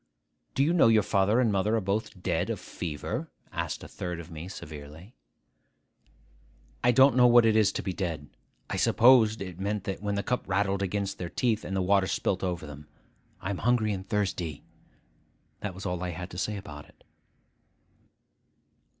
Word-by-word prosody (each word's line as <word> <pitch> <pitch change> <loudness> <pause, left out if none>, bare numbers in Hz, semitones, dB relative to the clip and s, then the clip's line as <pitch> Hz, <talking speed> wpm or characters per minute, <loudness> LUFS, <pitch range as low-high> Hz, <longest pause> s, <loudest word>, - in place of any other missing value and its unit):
'Do 135 - +3
you 160 +4 +2
know 175 - +5
your 110 -2 +5
father 100 +4 +2
and 120 -4 +3
mother 100 +3 +1
are - - +2
both 100 -1 -3
dead - - 0
of - - -2
fever?' 75 -4 -5 0.2
asked - - -3
a - - -8
third 90 -2 -5
of 85 +1 -10
me 80 +2 -7
severely. 80 - -10 1.7
'I 120 - +5
don't 135 +2 +6
know 125 -1 +7
what 120 -1 +6
it 110 -1 +4
is 110 -2 +4
to - - -4
be 95 - -2
dead. 80 -6 -4 0.4
I - - -3
supposed 115 -4 +5
it 90 -2 -9
meant 100 0 -2
that, 95 0 -4
when 105 -1 -1
the 100 - -1
cup 125 - -1
rattled 100 0 0
against 100 0 -2
their 90 -2 -4
teeth, 110 -1 0
and 95 - -4
the 95 - +1
water 95 0 +3
spilt 95 0 -1
over 90 -3 -2
them. 75 0 -10 0.5
I 95 - -3
am 95 - -4
hungry 115 -2 +2
and 95 0 -7
thirsty.' 95 -7 -2 1.0
That 100 -4 -5
was 95 - -8
all 90 -2 -2
I 90 - -2
had 90 +2 -6
to 90 - -8
say 105 +1 -2
about 75 -7 -9
it. - - -24
100 Hz, 185 wpm, -28 LUFS, 90-110 Hz, 1.7 s, know